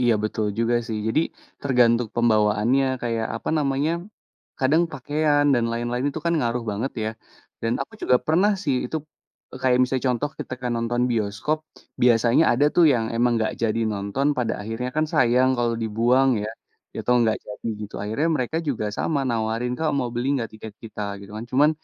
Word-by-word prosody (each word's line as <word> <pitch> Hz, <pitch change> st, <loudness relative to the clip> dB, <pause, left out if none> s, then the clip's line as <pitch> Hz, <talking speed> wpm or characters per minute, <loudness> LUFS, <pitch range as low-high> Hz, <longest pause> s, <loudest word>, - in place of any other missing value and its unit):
Iya, 120 Hz, -1 st, +4 dB
betul 110 Hz, 0 st, -1 dB
juga 115 Hz, +1 st, +2 dB
sih. 110 Hz, -2 st, -3 dB
Jadi, 130 Hz, +8 st, +2 dB, 0.4 s
tergantung 120 Hz, -3 st, +3 dB
pembawaannya 110 Hz, +3 st, +3 dB, 0.2 s
kayak, 115 Hz, -2 st, -1 dB
apa -, -, -6 dB
namanya, 145 Hz, +2 st, +1 dB, 0.7 s
kadang 145 Hz, +6 st, +3 dB
pakaian 145 Hz, +2 st, +1 dB
dan 120 Hz, -2 st, +1 dB
lain-lain 120 Hz, +2 st, -2 dB
itu 160 Hz, -, -6 dB
kan 170 Hz, -, +2 dB
ngaruh 120 Hz, -2 st, -1 dB
banget 110 Hz, +7 st, -3 dB
ya, 110 Hz, -, -1 dB, 0.5 s
dan 115 Hz, 0 st, 0 dB
aku -, -, -12 dB
juga 125 Hz, -, +4 dB
pernah 185 Hz, +7 st, +3 dB
sih, 140 Hz, -, +1 dB
itu, 160 Hz, -, -2 dB, 0.6 s
e -, -, -7 dB
kayak 125 Hz, -1 st, +3 dB
misalnya 130 Hz, +1 st, 0 dB
contoh 145 Hz, +5 st, -2 dB
ketika 125 Hz, -1 st, -5 dB
nonton 120 Hz, +1 st, 0 dB
bioskop, 110 Hz, +7 st, -1 dB, 0.4 s
biasanya 120 Hz, +4 st, +4 dB
ada 140 Hz, +5 st, +3 dB
tuh 175 Hz, -, +7 dB
yang 115 Hz, -2 st, +1 dB
emang 120 Hz, +1 st, +2 dB
nggak 110 Hz, -, -1 dB
jadi 115 Hz, 0 st, +1 dB
nonton 100 Hz, +7 st, -2 dB
pada 125 Hz, -, 0 dB
akhirnya 115 Hz, +4 st, -4 dB
kan 155 Hz, -, +3 dB
sayang 125 Hz, +1 st, +4 dB
kalau 120 Hz, -1 st, +1 dB
dibuang 120 Hz, +5 st, +3 dB
ya, 110 Hz, -, -3 dB, 0.5 s
atau 125 Hz, -, +2 dB
nggak 110 Hz, -1 st, +2 dB
jadi 105 Hz, +2 st, -6 dB, 0.2 s
gitu, 100 Hz, -, -12 dB
akhirnya 110 Hz, +10 st, 0 dB
mereka 130 Hz, +5 st, -2 dB
juga 115 Hz, -6 st, -1 dB
sama 145 Hz, -3 st, 0 dB
nawarin, 115 Hz, +1 st, -1 dB
"Kak, 160 Hz, -1 st, +1 dB
mau 125 Hz, -, -1 dB
beli 120 Hz, +3 st, -1 dB
nggak 115 Hz, -2 st, -4 dB
tiket 110 Hz, -1 st, -9 dB
kita?" 110 Hz, -2 st, -6 dB, 0.2 s
Gitu 100 Hz, -, -12 dB
kan. 110 Hz, -, -5 dB
Cuman, 145 Hz, +4 st, +4 dB
120 Hz, 180 wpm, -24 LUFS, 115-135 Hz, 0.7 s, tuh